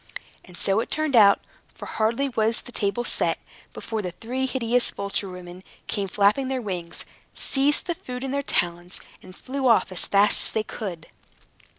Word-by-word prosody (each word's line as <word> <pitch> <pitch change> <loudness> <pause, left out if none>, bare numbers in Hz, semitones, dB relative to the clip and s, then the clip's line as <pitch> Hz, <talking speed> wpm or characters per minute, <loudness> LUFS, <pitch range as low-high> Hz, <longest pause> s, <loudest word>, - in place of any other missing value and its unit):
And 180 -1 -12
so 195 +2 +2
it - - -3
turned 310 -3 0
out; 200 -3 +7 0.3
for, - - -9
hardly 230 +5 0
was 225 -1 +1
the - - -9
table 215 +2 -1
set, - - 0 0.3
before 220 -1 -4
the 185 - -3
three 255 +5 -3
hideous 245 -1 +1
vulture 200 0 -2
women 180 0 -10 0.2
came 200 -1 -2
flapping 210 +7 +2
their 265 0 -1
wings, 180 -7 -5 0.3
seized 280 +2 +1
the 345 - -1
food 250 -5 -7
in 270 - -3
their 280 0 0
talons, 175 -7 -1 0.2
and 185 - -13
flew 265 +3 -3
off 230 -4 +4
as 185 - -2
fast 200 +1 +6
as - - -3
they 220 - 0
could. 185 -8 -6
220 Hz, 180 wpm, -24 LUFS, 195-255 Hz, 0.3 s, out